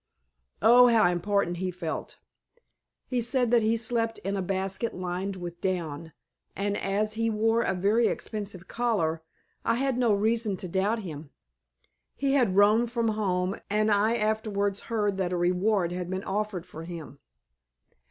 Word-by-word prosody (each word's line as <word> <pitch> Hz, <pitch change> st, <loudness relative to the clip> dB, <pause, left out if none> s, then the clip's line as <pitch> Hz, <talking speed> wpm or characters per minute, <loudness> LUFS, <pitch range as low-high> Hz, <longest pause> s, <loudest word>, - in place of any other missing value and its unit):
Oh, 245 Hz, +3 st, +8 dB
how 220 Hz, -7 st, +4 dB
important 175 Hz, 0 st, 0 dB
he 185 Hz, +1 st, -2 dB
felt! 175 Hz, -3 st, -5 dB, 0.9 s
He 250 Hz, -2 st, -1 dB
said 245 Hz, 0 st, +1 dB
that 240 Hz, -1 st, +5 dB
he 220 Hz, +1 st, +2 dB
slept 230 Hz, 0 st, -1 dB
in 200 Hz, +1 st, -1 dB
a 195 Hz, -, -1 dB
basket 195 Hz, +4 st, -2 dB
lined 185 Hz, +2 st, -3 dB
with 175 Hz, -2 st, -7 dB
down, 165 Hz, -4 st, -3 dB, 0.4 s
and, 200 Hz, +1 st, -1 dB
as 210 Hz, +2 st, -1 dB
he 225 Hz, +1 st, 0 dB
wore 225 Hz, +1 st, +2 dB
a 190 Hz, -, 0 dB
very 210 Hz, +6 st, +3 dB
expensive 200 Hz, -4 st, -4 dB
collar, 200 Hz, -10 st, 0 dB, 0.4 s
I -, -, +2 dB
had 260 Hz, 0 st, 0 dB
no 240 Hz, -3 st, +3 dB
reason 215 Hz, 0 st, +1 dB
to 185 Hz, -, -6 dB
doubt 200 Hz, +5 st, 0 dB
him. 155 Hz, -4 st, -8 dB, 0.9 s
He 275 Hz, -1 st, 0 dB
had 240 Hz, -9 st, +3 dB
roamed 215 Hz, +4 st, +5 dB
from 235 Hz, -2 st, 0 dB
home 190 Hz, -3 st, -1 dB
and 215 Hz, +1 st, +2 dB
I 210 Hz, +3 st, +3 dB
afterwards 210 Hz, -2 st, 0 dB
heard 205 Hz, -4 st, 0 dB
that 185 Hz, -2 st, -1 dB
a -, -, 0 dB
reward 180 Hz, +1 st, +1 dB
had 180 Hz, 0 st, -4 dB
been 190 Hz, +1 st, -3 dB
offered 205 Hz, -3 st, -3 dB
for 160 Hz, -, -10 dB
him. 165 Hz, -4 st, -8 dB
205 Hz, 160 wpm, -27 LUFS, 180-225 Hz, 0.9 s, Oh